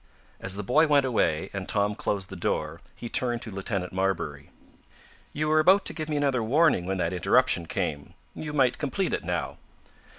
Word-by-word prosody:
As 95 0 -4
the 105 - -4
boy 155 +10 +4
went 145 -2 +4
away, 95 -8 0
and 100 -2 -5
Tom 105 0 +1
closed 100 -2 -3
the - - -6
door, 90 - -2
he 120 - -7
turned 120 0 +1
to 110 - -6
Lieutenant 95 -2 -3
Marbury. 95 -7 -2 0.8
"You 155 +1 -2
were 155 0 +4
about 190 +5 +5
to - - -1
give 155 -2 -5
me 150 - -1
another 140 -4 +1
warning 130 - +2
when 95 0 -1
that 90 -1 -1
interruption 90 0 +2
came. 70 -2 -4 0.2
You 150 - -6
might 135 -4 +2
complete 170 +7 -1
it - - -2
now." - - -3
110 Hz, 190 wpm, -26 LUFS, 95-145 Hz, 0.8 s, about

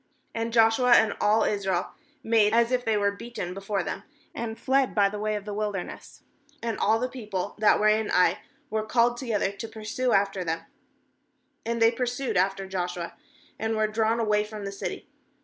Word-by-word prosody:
16And 230 0 -2
Joshua 230 +2 +5
and 220 -3 +5
all 215 +1 +4
Israel 190 -3 -1 0.3
made 220 -2 +3
as 235 +1 +3
if 250 -1 +1
they 220 -2 +1
were 200 0 +2
beaten 200 -4 -6
before 195 0 -2
them, - - -4 0.3
and 225 -1 -4
fled 265 -1 +1
by 200 -2 +4
the 210 +1 -6
way 215 0 -1
of 205 -1 -5
the 210 - -5
wilderness. 205 -3 -5 0.4
16And 230 -2 -2
all 220 +2 +3
the 250 +2 -1
people 215 -7 -5
that 215 - +4
were 215 - +3
in 215 0 +2
Ai 180 - +3 0.3
were 220 0 0
called 240 +2 +2
together 220 -6 -1
to 200 +3 -7
pursue 225 +3 -2
after 195 -2 +1
them; 165 -1 -2 1.1
and 235 0 -1
they 225 0 +5
pur 245 +1 -2
sued 245 -2 -2
after 195 +1 +1
Joshua, 180 -2 -4 0.5
and 220 +1 -1
were 215 0 +2
drawn 220 +1 +1
away 210 -2 +2
from 210 -1 -7
the 195 - -4
city. 200 - -6
215 Hz, 190 wpm, -26 LUFS, 200-230 Hz, 1.1 s, Joshua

